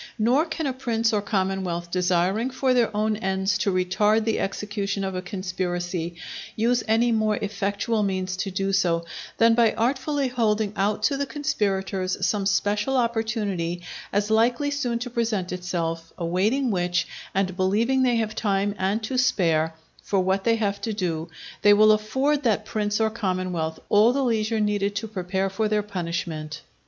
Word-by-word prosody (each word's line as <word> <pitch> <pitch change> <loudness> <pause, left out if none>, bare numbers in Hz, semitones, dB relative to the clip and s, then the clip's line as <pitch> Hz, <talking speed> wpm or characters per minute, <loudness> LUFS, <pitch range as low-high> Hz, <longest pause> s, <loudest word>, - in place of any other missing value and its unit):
Nor 245 +8 +3
can 320 -1 -3
a 270 - 0
prince 230 -3 0
or 210 - +2
commonwealth 190 -4 -2
desiring 185 +6 +1
for 260 0 +1
their 240 -2 +3
own 215 0 +1
ends 190 -1 0
to 200 - +1
retard 210 +4 +2
the 225 0 0
execution 200 0 -2
of 190 0 -2
a 185 - -3
conspiracy, 175 -2 -3 0.4
use 240 +3 +2
any 230 +2 +3
more 215 -1 +2
effectual 205 +2 -1
means 185 -2 -1
to 195 - -2
do 195 +1 -1
so, 170 -3 +1 0.3
than 230 0 +5
by 230 -1 +4
artfully 265 +4 0
holding 220 -4 0
out 205 +2 0
to 275 +6 +2
the 280 0 -2
conspirators 195 -10 -1
some 200 -2 0
special 210 +6 +1
opportunity 215 -7 -1 0.3
as 205 +2 0
likely 240 +6 +2
soon 250 -5 -1
to 245 +1 -5
present 225 -6 -1
itself; 165 -2 -3
awaiting 205 +10 +1
which, 175 -2 0 0.3
and 190 -1 0
believing 215 +8 +2
they 250 -2 +3
have 220 -2 -1
time 205 -2 0
and 200 +4 0
to 255 +4 -1
spare 165 -10 +2 0.3
for 195 - 0
what 190 +1 0
they 230 -1 +4
have 200 -3 -1
to 225 - -2
do, 170 -5 -2 0.3
they 205 0 +7
will 215 +1 +6
afford 265 +8 +1
that 215 -5 +1
prince 210 -1 -1
or 220 0 +2
commonwealth 185 -6 -2
all 215 +3 +5
the 275 0 0
leisure 225 -2 0
needed 205 -1 0
to 220 +2 -2
prepare 190 -1 -2
for 205 +3 -1
their 210 0 +1
punishment. 170 -5 -4
205 Hz, 165 wpm, -24 LUFS, 185-230 Hz, 0.4 s, they